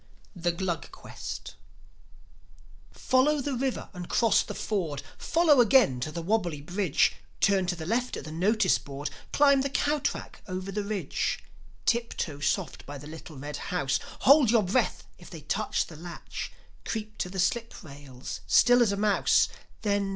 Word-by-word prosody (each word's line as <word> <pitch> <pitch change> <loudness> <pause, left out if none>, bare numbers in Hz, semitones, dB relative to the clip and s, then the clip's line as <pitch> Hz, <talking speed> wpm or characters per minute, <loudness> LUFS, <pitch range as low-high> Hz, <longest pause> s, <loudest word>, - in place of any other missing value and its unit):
THE 175 -1 0
GLUG 170 0 -3
QUEST - - -8 1.4
Follow 280 +4 +2
the 280 +1 -2
river 260 +1 -2
and 180 -2 -7
cross 230 -3 +4
the - - -6
ford, 170 -10 -2
Follow 320 -6 +4
again 225 - +5
to 155 +5 -3
the 170 +2 -5
wobbly 175 -6 0
bridge, 175 +2 +1 0.2
Turn 195 -2 +3
to 180 - 0
the 160 -2 -7
left 240 +6 -1
at - - -6
the 155 - -7
notice 190 +4 +2
board, 140 +1 -6 0.2
Climbing 280 -2 +5
the 275 - -1
cow 295 +2 +1
track 285 - -4
over 185 +1 -4
the 205 +1 -2
ridge; 200 -1 -2 0.4
Tip 235 0 +1
toe 145 -4 -3
soft 145 - -1
by 145 0 -6
the 145 - -11
little 155 0 -10
red 145 +2 -5
house, 135 -7 -1 0.2
Hold 280 -3 +7
your 225 -2 +4
breath 195 +8 0 0.2
if - - -13
they - - -9
touch - - -1
the 160 - -12
latch, 170 +2 -7 0.3
Creep 215 -1 -5
to 180 - -2
the 190 - -7
slip 230 +6 0
rails, 140 -4 -8
still 245 +1 +6
as 225 -4 +4
a 200 - -1
mouse, 205 -1 +3 0.3
Then 200 -2 +1
195 Hz, 170 wpm, -28 LUFS, 160-235 Hz, 1.4 s, Hold